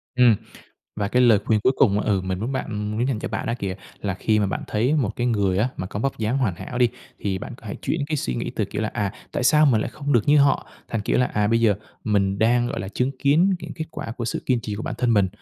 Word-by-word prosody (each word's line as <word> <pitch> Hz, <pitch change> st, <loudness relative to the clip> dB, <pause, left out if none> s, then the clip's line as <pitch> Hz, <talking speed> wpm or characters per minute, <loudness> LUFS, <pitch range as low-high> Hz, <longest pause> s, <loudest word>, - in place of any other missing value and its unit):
Ừm, 125 Hz, -3 st, +6 dB, 0.6 s
và 105 Hz, -1 st, -1 dB
cái 125 Hz, +4 st, +3 dB
lời 115 Hz, -4 st, +6 dB
khuyên 110 Hz, -1 st, +2 dB
cuối 130 Hz, -, +4 dB
cùng, 105 Hz, -5 st, +4 dB
ừ, 100 Hz, -2 st, +1 dB
mình 95 Hz, 0 st, -3 dB
muốn 120 Hz, +5 st, -2 dB
bạn, 130 Hz, -, -2 dB
ừm 105 Hz, -1 st, -3 dB
muốn 115 Hz, +4 st, 0 dB
dành 130 Hz, -5 st, 0 dB
cho -, -, -4 dB
bạn -, -, -3 dB
đó 115 Hz, -, 0 dB
kìa, 95 Hz, -4 st, -3 dB, 0.3 s
là 100 Hz, -2 st, -2 dB
khi 105 Hz, +3 st, +1 dB
mà 105 Hz, -, +2 dB
bạn 95 Hz, -, -3 dB
thấy 120 Hz, +7 st, +1 dB
một 120 Hz, -8 st, 0 dB
cái 120 Hz, -, 0 dB
người 100 Hz, -5 st, +1 dB
á 110 Hz, +5 st, +2 dB
mà 95 Hz, -, -4 dB
có 105 Hz, -, -5 dB
vóc 135 Hz, +2 st, -1 dB
dáng 110 Hz, +4 st, 0 dB
hoàn 115 Hz, -9 st, +1 dB
hảo 125 Hz, -, -6 dB
đi, 125 Hz, -1 st, +5 dB, 0.3 s
thì 95 Hz, -2 st, -2 dB
bạn 120 Hz, -, -7 dB
có 115 Hz, -, -15 dB
hãy 100 Hz, -, -5 dB
chuyển 165 Hz, -, -1 dB
cái 155 Hz, 0 st, -1 dB
suy 65 Hz, -, -2 dB
nghĩ -, -, -3 dB
từ, -, -, +1 dB
kiểu 105 Hz, -, -4 dB
là 110 Hz, -, -1 dB
"À, 100 Hz, -1 st, -1 dB, 0.2 s
tại -, -, -1 dB
sao 150 Hz, +4 st, +6 dB
mình 120 Hz, -6 st, +4 dB
lại -, -, -3 dB
không 145 Hz, -1 st, -3 dB
được 120 Hz, +2 st, +2 dB
như 150 Hz, +1 st, +6 dB
họ?" 140 Hz, -1 st, +3 dB, 0.2 s
thành, 115 Hz, -, -2 dB
kiểu 105 Hz, -, 0 dB
là 125 Hz, -, +3 dB
"À, 105 Hz, -3 st, 0 dB
bây 115 Hz, +2 st, +2 dB
giờ 110 Hz, -3 st, +4 dB, 0.3 s
mình 100 Hz, -2 st, +1 dB
đang, 120 Hz, +3 st, +3 dB
gọi -, -, -3 dB
là, 95 Hz, -, -5 dB
chứng 125 Hz, +6 st, 0 dB
kiến 160 Hz, +8 st, +4 dB
những -, -, -7 dB
kết 160 Hz, -, -4 dB
quả 115 Hz, -, -6 dB
của 120 Hz, -, -3 dB
sự 115 Hz, -, -3 dB
kiên 125 Hz, -3 st, +2 dB
trì 105 Hz, -2 st, -4 dB
của 105 Hz, -, -5 dB
bản -, -, -3 dB
thân 120 Hz, -1 st, +2 dB
mình." 100 Hz, -3 st, +3 dB
115 Hz, 300 wpm, -23 LUFS, 105-125 Hz, 0.6 s, Ừm